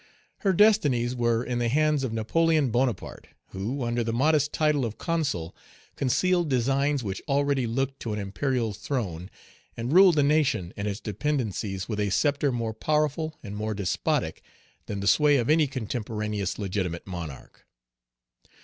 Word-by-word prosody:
Her 195 Hz, -, +2 dB
destinies 165 Hz, -, +3 dB
were 120 Hz, -1 st, +1 dB
in 125 Hz, -1 st, -2 dB
the 120 Hz, -1 st, +1 dB
hands 150 Hz, +1 st, +2 dB
of 130 Hz, -, -2 dB
Napoleon 150 Hz, +5 st, +2 dB
Bonaparte, 120 Hz, -3 st, -2 dB, 0.2 s
who, 115 Hz, +8 st, -3 dB
under 120 Hz, 0 st, 0 dB
the 115 Hz, -, -2 dB
modest 145 Hz, +4 st, +2 dB
title 150 Hz, -3 st, +1 dB
of 110 Hz, -2 st, -4 dB
Consul, 145 Hz, -, -2 dB, 0.4 s
concealed 175 Hz, +5 st, +1 dB
designs 135 Hz, +2 st, +1 dB
which 95 Hz, -2 st, -4 dB
already 140 Hz, -2 st, +1 dB
looked 135 Hz, +3 st, -2 dB
to 115 Hz, -, -4 dB
an 105 Hz, -, -2 dB
imperial 110 Hz, +3 st, -1 dB
throne, 95 Hz, -, -4 dB, 0.5 s
and 120 Hz, +5 st, -2 dB
ruled 185 Hz, -1 st, +7 dB
the 145 Hz, -, +3 dB
nation 140 Hz, -, +1 dB
and 100 Hz, +1 st, -3 dB
its 100 Hz, 0 st, -3 dB
dependencies 105 Hz, -5 st, -2 dB
with 105 Hz, -2 st, -3 dB
a 105 Hz, -1 st, +1 dB
sceptre 145 Hz, +6 st, +1 dB
more 115 Hz, -2 st, -2 dB
powerful 155 Hz, +4 st, -1 dB
and 105 Hz, -2 st, -7 dB
more 110 Hz, 0 st, -3 dB
despotic 100 Hz, -3 st, -1 dB, 0.5 s
than 100 Hz, -1 st, -4 dB
the 100 Hz, -, -2 dB
sway 150 Hz, +4 st, +5 dB
of 120 Hz, +3 st, +1 dB
any 155 Hz, -1 st, +4 dB
contemporaneous 105 Hz, -5 st, -3 dB
legitimate 95 Hz, -4 st, -3 dB
monarch. 85 Hz, -7 st, -8 dB
125 Hz, 155 wpm, -26 LUFS, 105-145 Hz, 0.5 s, ruled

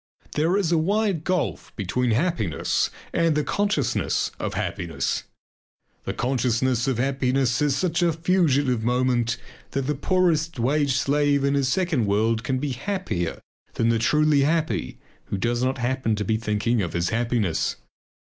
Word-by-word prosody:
There 165 Hz, +6 st, +1 dB
is 185 Hz, -5 st, 0 dB
a 165 Hz, -, +3 dB
wide 195 Hz, -1 st, +1 dB
gulf 150 Hz, -, -2 dB
between 120 Hz, +6 st, -1 dB
happiness 115 Hz, -, 0 dB, 0.2 s
and 165 Hz, -2 st, +2 dB
the 150 Hz, -, +1 dB
consciousness 200 Hz, -, 0 dB
of -, -, -3 dB
happiness. -, -, -2 dB, 0.8 s
The -, -, -2 dB
consciousness 125 Hz, -1 st, 0 dB
of 130 Hz, -4 st, 0 dB
happiness 130 Hz, -1 st, +1 dB
is 145 Hz, -2 st, +2 dB
such 170 Hz, +1 st, 0 dB
a 170 Hz, -1 st, +3 dB
fugitive 150 Hz, -8 st, +1 dB
moment 120 Hz, -1 st, +1 dB, 0.4 s
that 135 Hz, -1 st, -1 dB
the 150 Hz, -, 0 dB
poorest 165 Hz, +1 st, +1 dB
wage 140 Hz, +3 st, +1 dB
slave 145 Hz, 0 st, +2 dB
in 140 Hz, 0 st, +2 dB
his 140 Hz, -2 st, +1 dB
second 155 Hz, -, +1 dB
world 110 Hz, +3 st, +1 dB
can 130 Hz, +2 st, -1 dB
be 140 Hz, +1 st, -2 dB
happier 125 Hz, -, -3 dB, 0.3 s
than 115 Hz, -, +2 dB
the 115 Hz, -1 st, +2 dB
truly 150 Hz, +5 st, +3 dB
happy 150 Hz, -, 0 dB, 0.3 s
who 100 Hz, -, -3 dB
does 120 Hz, +4 st, 0 dB
not 130 Hz, +1 st, 0 dB
happen 125 Hz, -2 st, 0 dB
to 105 Hz, 0 st, -3 dB
be 110 Hz, -, +1 dB
thinking 110 Hz, +1 st, 0 dB
of 90 Hz, -, -3 dB
his 85 Hz, 0 st, 0 dB
happiness. 115 Hz, -7 st, 0 dB
130 Hz, 155 wpm, -24 LUFS, 115-155 Hz, 0.8 s, a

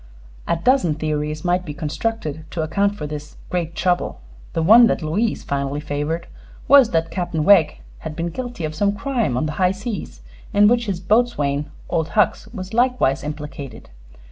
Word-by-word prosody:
A -, -, +2 dB
dozen 175 Hz, -, +2 dB
theories 150 Hz, 0 st, -3 dB
might 180 Hz, +1 st, +1 dB
be 150 Hz, -5 st, -7 dB
constructed 155 Hz, 0 st, -3 dB
to 165 Hz, -, -3 dB
account 200 Hz, +6 st, +1 dB
for 150 Hz, -, -5 dB
this 150 Hz, 0 st, -7 dB
"great 170 Hz, -2 st, -2 dB
trouble." 175 Hz, -, 0 dB, 0.3 s
The 165 Hz, -, 0 dB
one 230 Hz, +7 st, +8 dB
that 175 Hz, -, -1 dB
Louise 205 Hz, +9 st, -1 dB
finally 140 Hz, 0 st, -2 dB
favored 150 Hz, +3 st, -3 dB, 0.4 s
was 270 Hz, -3 st, +7 dB
that 165 Hz, 0 st, 0 dB
Captain 170 Hz, -4 st, -2 dB
Wegg 165 Hz, -5 st, +5 dB, 0.2 s
had 160 Hz, -1 st, -7 dB
been 170 Hz, +1 st, -2 dB
guilty 245 Hz, -2 st, -5 dB
of 155 Hz, -, -4 dB
some 200 Hz, +5 st, +1 dB
crime 235 Hz, -, -1 dB
on 130 Hz, -, 0 dB
the 150 Hz, -, -2 dB
high 180 Hz, -, +5 dB
seas 200 Hz, -, -6 dB, 0.3 s
in 205 Hz, 0 st, +6 dB
which 235 Hz, 0 st, +2 dB
his 190 Hz, -3 st, -2 dB
boatswain, 175 Hz, -9 st, +1 dB, 0.2 s
Old 160 Hz, -1 st, 0 dB
Hucks, 210 Hz, -, +2 dB
was 195 Hz, -2 st, -8 dB
likewise 240 Hz, -, +2 dB
implicated. 145 Hz, -, -7 dB
170 Hz, 170 wpm, -21 LUFS, 150-205 Hz, 0.4 s, one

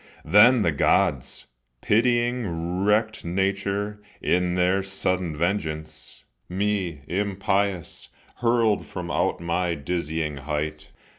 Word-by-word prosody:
Then 105 Hz, +7 st, +6 dB
the 85 Hz, -, +2 dB
Gods, 75 Hz, -, +1 dB, 0.4 s
Pitying 110 Hz, -7 st, +1 dB
wrecked 110 Hz, +2 st, +1 dB
nature, 100 Hz, +3 st, -1 dB, 0.2 s
in 90 Hz, 0 st, +1 dB
their 90 Hz, +2 st, +2 dB
sudden 95 Hz, -4 st, -2 dB
vengeance, 80 Hz, -4 st, -3 dB, 0.3 s
Me, 95 Hz, -5 st, -1 dB
impious, 100 Hz, -1 st, -1 dB, 0.3 s
hurled 115 Hz, -3 st, +2 dB
from 90 Hz, -2 st, -6 dB
out -, -, 0 dB
my 85 Hz, +1 st, -1 dB
dizzying 80 Hz, -1 st, -3 dB
height. 75 Hz, +2 st, -4 dB
90 Hz, 95 wpm, -25 LUFS, 85-105 Hz, 0.4 s, Then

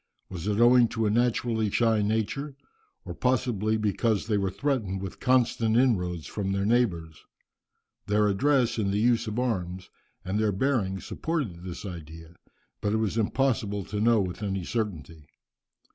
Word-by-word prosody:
Was 90 Hz, 0 st, -6 dB
it 105 Hz, 0 st, 0 dB
owing 120 Hz, 0 st, +6 dB
to 115 Hz, -1 st, -2 dB
a 105 Hz, -, +2 dB
naturally 115 Hz, -1 st, +1 dB
shy 115 Hz, 0 st, +2 dB
nature? 110 Hz, +7 st, -2 dB, 0.5 s
or -, -, -5 dB
possibly 120 Hz, -4 st, 0 dB
because 105 Hz, 0 st, 0 dB
they 110 Hz, -2 st, 0 dB
were 95 Hz, -1 st, 0 dB
threatened 105 Hz, -3 st, -2 dB
with 95 Hz, -1 st, -7 dB
constant 120 Hz, -3 st, +2 dB
inroads 90 Hz, -10 st, +1 dB
from 95 Hz, -2 st, -3 dB
their 100 Hz, 0 st, 0 dB
neighbours. 90 Hz, -10 st, 0 dB, 0.8 s
Their 105 Hz, 0 st, +3 dB
address 120 Hz, +3 st, +2 dB
in 100 Hz, -2 st, 0 dB
the 100 Hz, -, 0 dB
use 115 Hz, +1 st, +2 dB
of 110 Hz, +1 st, -4 dB
arms 95 Hz, -7 st, -2 dB, 0.3 s
and 95 Hz, +3 st, -1 dB
their 110 Hz, -1 st, +2 dB
bearing 100 Hz, -3 st, 0 dB
supported 140 Hz, -, -3 dB
this 90 Hz, +2 st, -7 dB
idea, 80 Hz, -2 st, -9 dB, 0.5 s
but 105 Hz, -, 0 dB
it -, -, +2 dB
was 110 Hz, -2 st, -1 dB
impossible 110 Hz, -3 st, 0 dB
to 105 Hz, -1 st, -4 dB
know 115 Hz, 0 st, +4 dB
with 90 Hz, 0 st, -3 dB
any 95 Hz, -3 st, -2 dB
certainty. 85 Hz, -, -4 dB
105 Hz, 160 wpm, -27 LUFS, 95-120 Hz, 0.8 s, owing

